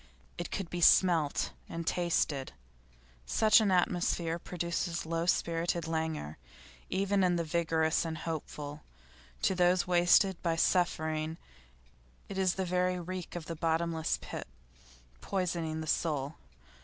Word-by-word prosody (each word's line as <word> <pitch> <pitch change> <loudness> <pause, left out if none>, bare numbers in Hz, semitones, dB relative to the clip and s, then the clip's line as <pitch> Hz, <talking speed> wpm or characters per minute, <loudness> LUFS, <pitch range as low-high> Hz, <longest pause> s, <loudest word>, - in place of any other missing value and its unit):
It 175 - -4
could 195 -3 -3
be 175 - -3
smelt 165 -4 +4 0.2
and 165 0 -5
tasted. 160 -6 0 0.7
Such 220 0 +5
an 210 - +2
atmosphere 175 -2 +1
produces 170 -1 -3
low 165 +1 -2
spirited 170 -1 0
languor 160 - -3 0.5
even 195 +1 +1
in 180 -1 +3
the 170 - 0
vigorous 160 -1 +1
and 160 -1 -4
hopeful; 150 -2 -5 0.6
to - - +3
those 180 0 +3
wasted 180 +1 +4
by 165 -2 0
suffering 160 -2 +1 0.9
it 195 - -4
is 185 -1 +2
the 190 - -1
very 180 0 0
reek 180 0 -6
of 170 -2 -5
the 165 - -5
bottomless 165 0 0
pit, - - -6 0.7
poisoning 170 -4 -2
the - - -5
soul. 150 -2 -1
170 Hz, 130 wpm, -31 LUFS, 160-180 Hz, 0.9 s, Such